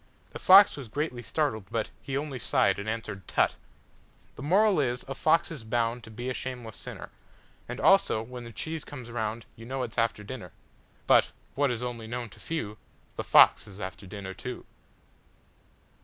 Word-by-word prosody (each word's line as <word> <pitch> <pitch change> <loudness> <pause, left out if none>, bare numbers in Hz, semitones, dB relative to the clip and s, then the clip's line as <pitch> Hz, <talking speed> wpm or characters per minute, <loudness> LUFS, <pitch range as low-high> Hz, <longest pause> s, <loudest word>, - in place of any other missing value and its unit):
The - - -7
fox 195 -1 +8
was 135 -4 -7
greatly 130 +1 -3
startled, 110 -3 -1
butHe 115 +4 -3
only 140 -3 -4
sighed 120 -7 +2
and 100 +2 -4
answered 110 -5 -5
"Tut!"THE - - -4
MORAL 190 +5 +4
is: 125 -2 0
A 135 - -3
fox 160 +5 +2
is 145 -8 -6
boundTo 115 0 -2
be 120 +2 -5
a 130 - -1
shameless 125 -4 -5
sinner. - - -7 0.6
And 125 +2 -5
also: 195 - +4
When 125 +1 -8
the 115 - -9
cheese 160 +6 -4
comes 125 -5 -9
roundYou 115 0 -5
know 130 0 -2
it 115 -3 -5
's - - -1
after 115 -2 0
dinner. 105 -6 -8 0.5
But - - +5 0.2
(what 140 0 +2
is 120 -1 -2
only 120 -2 -5
known 120 0 -4
to - - -16
few)The 110 -11 -6
fox - - +6
is 100 0 -12
after 95 0 -7
dinner, 95 0 -7
too. 95 - -7
120 Hz, 170 wpm, -28 LUFS, 110-135 Hz, 0.6 s, fox